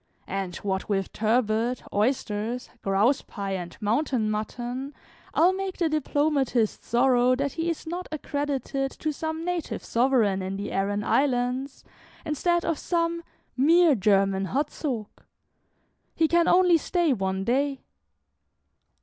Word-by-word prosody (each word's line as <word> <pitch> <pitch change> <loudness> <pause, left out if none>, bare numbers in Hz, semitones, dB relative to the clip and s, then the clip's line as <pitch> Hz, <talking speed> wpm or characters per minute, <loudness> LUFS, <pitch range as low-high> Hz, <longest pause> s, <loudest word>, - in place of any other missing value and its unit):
And 195 -2 -4
what 190 +1 -3
with 195 -2 -1
turbot, 225 +2 +1
oysters, 225 +1 -1
grouse 205 +8 +2
pie, 200 -2 -6
and 175 -3 -5
mountain 225 0 0
mutton, 245 +6 -4 0.4
I - - 0
'll 370 - +5
make 385 0 -4
the 335 -2 +1
diplomatist 285 -6 0
sorrow 250 +1 +3
that 280 +2 -1
he 330 +1 -2
is 335 - -4
not 350 +3 -5
accredited 285 -2 -2
to 310 - -3
some 320 +2 -4
native 355 -2 -3
sovereign 230 -6 +2
in 190 +1 -3
the 200 +1 -4
Arran 205 +1 -1
islands, 260 +1 0 0.4
instead 345 +4 0
of 330 -2 -1
some 335 -1 0 0.3
'mere 325 +4 +5
German 195 -3 +2
Hertzog.' 265 -3 -3 0.9
He 325 - +3
can 340 +1 +3
only 360 -1 +5
stay 340 -2 +1
one 190 -3 -2
day." 270 +5 0
255 Hz, 130 wpm, -26 LUFS, 210-310 Hz, 0.9 s, ll